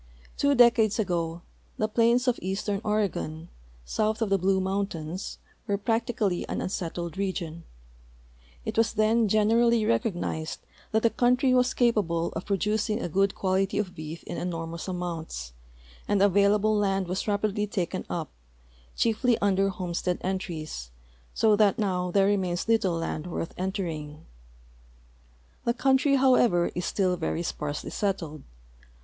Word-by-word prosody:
Two 285 0 +2
decades 235 -4 +5
ago 170 -5 -1 0.3
the 215 - +1
plains 235 +3 +3
of 250 - +2
eastern 195 +2 -2
Oregon, 195 -6 -2 0.4
soiith 215 - 0
of 225 -3 0
the 195 - +3
Blue 190 +1 +2
mountains, 190 -3 -3 0.3
were 200 - +1
practically 220 -3 0
an - - -2
unsettled 175 -1 -4
region. 170 -4 -3 1.0
It - - -1
was 225 0 +2
then 220 +1 +3
generally 225 +2 +3
recognized 160 - -1 0.3
that 220 0 +1
the 230 - +4
country 250 +1 +3
was 250 0 +3
capalde 195 -9 +1
of 165 - -5
pro 200 -1 +1
ducing 210 +3 0
a 245 - -2
good 195 +4 +1
quality 195 +1 0
of 195 -3 -1
beef 155 +1 -8
in 175 - -6
enormous 165 -1 -4
amounts, 165 - -5 0.5
and 205 -1 +2
the 200 - +6
available 205 +2 +3
land 195 -2 +1
was 185 +4 -3
rapidly 210 0 0
taken 185 -4 -2
up, - - -3 0.7
chierty 230 +1 +2
under 195 -1 +2
homestead 180 -1 -2
entries, 165 - -4 0.5
so 220 -2 +4
that 205 0 +3
now 185 -4 0
there 195 +2 +3
remains 190 -3 0
little 220 -6 +2
land 165 -1 -3
worth 165 -1 -4
entering. 165 -6 -4 1.4
The 235 - 0
country, 270 +2 +3
however, 245 -9 +4
is 175 - -3
still 185 -3 +1
very 165 0 -2
sparsely 150 -3 -4
settled. 165 -7 -2
195 Hz, 140 wpm, -27 LUFS, 175-215 Hz, 1.4 s, the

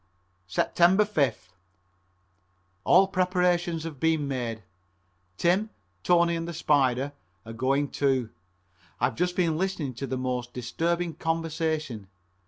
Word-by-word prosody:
Sept. - - -1
5th. 170 - +3 1.4
All 190 +2 +6
preparations 180 -3 +1
have 160 -5 -7
been 160 -2 +1
made. 120 -5 -3 0.7
Tim, 190 +6 +2 0.3
Tony 170 - +3
and 165 0 -3
the 170 - -5
Spider 140 -3 +1 0.3
are 115 - -8
going 135 +4 +1
too. 130 -5 0 0.7
I 120 - +3
have 130 - -2
just 180 +1 0
been 165 -3 +1
listening 180 -8 -2
to 135 +3 -5
the 130 - -2
most 125 -1 -3
disturbing 165 +8 -1
conversation. 160 - -2
155 Hz, 120 wpm, -27 LUFS, 130-175 Hz, 1.4 s, All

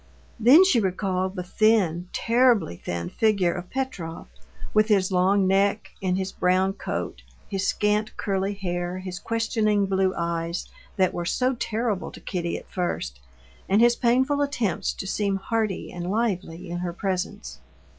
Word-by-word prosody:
Then 260 - +8
she 370 -11 +4
recalled 190 -1 -1
the 180 - -3
thin, 180 -3 +2
terribly 235 - +3
thin 85 -1 -4
figure 200 -6 +2
of 180 -1 -7
Petrov, 230 -12 -4 0.5
with 215 0 +4
his 195 -3 +2
long 190 +2 +3
neck, 195 +2 +2
in 185 -1 +1
his 190 0 -2
brown 185 +1 +2
coat, 60 - -4 0.3
his 195 0 -2
scant, 210 +1 0
curly 195 0 -1
hair, 175 -2 -3
his 185 -1 -6
questioning 220 -2 +1
blue 190 -1 +1
eyes 170 0 -2 0.3
that 185 -2 +2
were 175 - -3
so 255 +8 +1
terrible 225 -4 -2
to - - -10
Kitty 170 -2 -3
at - - -12
first, 65 - -3 0.5
and 200 +2 +4
his 240 +1 +5
painful 260 +5 +2
attempts 245 - 0
to - - -7
seem 200 0 0
hearty 215 0 -2
and 175 0 -5
lively 190 -5 -2
in 175 - -3
her 175 -1 -3
presence. 180 - -3
195 Hz, 155 wpm, -25 LUFS, 180-220 Hz, 0.5 s, Then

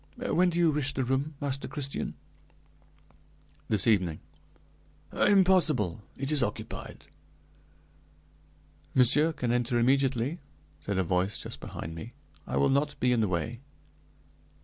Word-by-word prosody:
When 185 -8 +2
do 170 - -3
you 170 -2 +4
wish 145 -2 -1
the 130 - 0
room, 135 +4 -1
Master 140 -2 -3
Christian?" 140 -2 -4 1.5
"This 105 -3 +3
evening." 90 -8 +2 0.9
"Impossible! 175 - +3 0.2
it 135 +2 -3
is 150 -2 +3
occupied!" 120 - -5 1.9
"Monsieur 145 +6 +6
can 125 -6 -2
enter 120 0 0
immediately," 135 +3 +1 0.4
said 100 -1 -2
a 95 - +2
voice 90 +3 0
just - - -5
behind 80 - -7
me, 110 +9 -9 0.3
"I - - -2
will - - +3
not 145 +2 0
be 125 +1 +2
in 120 - +2
the 110 - +2
way." 95 +7 -3
130 Hz, 125 wpm, -28 LUFS, 110-150 Hz, 1.9 s, Monsieur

